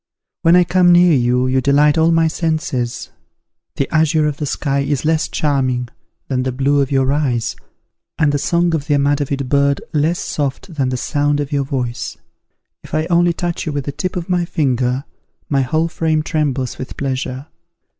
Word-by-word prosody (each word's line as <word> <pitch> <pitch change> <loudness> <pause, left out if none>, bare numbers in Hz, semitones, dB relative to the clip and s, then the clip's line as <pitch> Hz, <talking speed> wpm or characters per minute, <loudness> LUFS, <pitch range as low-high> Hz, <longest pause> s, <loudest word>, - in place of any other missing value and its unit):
When 165 +1 +5
I 180 - +6
come 175 0 +3
near 175 -1 +6
you, 125 -1 +2
you 130 0 +1
delight 145 +3 +4
all 160 0 +3
my 165 0 +3
senses. 155 -7 -2 0.6
The 135 - -1
azure 155 0 +3
of 150 -2 -1
the 150 - -3
sky 140 -1 -1
is 140 +1 -1
less 160 0 +1
charming 130 -4 -1 0.4
than 130 -2 -1
the 130 0 -1
blue 140 +3 +1
of 135 - -1
your 135 0 +2
eyes, 130 -6 -1 0.6
and 150 -2 +3
the 145 - 0
song 170 +3 +1
of 150 -3 -2
the 145 - +2
amadavid 140 -1 0
bird 140 +1 +2
less 155 +3 +1
soft 150 +6 -3
than 135 -4 0
the 125 - -2
sound 145 +3 0
of 145 0 -3
your 140 -1 0
voice. 125 -3 -4 0.7
If - - -6
I 155 0 +1
only 175 0 +3
touch 170 0 -3
you - - -1
with 145 -2 -3
the 140 - -3
tip 155 +6 -4
of 175 -2 -4
my 180 -2 +1
finger, 130 -5 0 0.5
my 140 -2 +2
whole 155 +6 0
frame 160 -2 0
trembles 140 -6 -2
with 130 - -7
pleasure. 130 0 -3
145 Hz, 185 wpm, -18 LUFS, 135-160 Hz, 0.7 s, I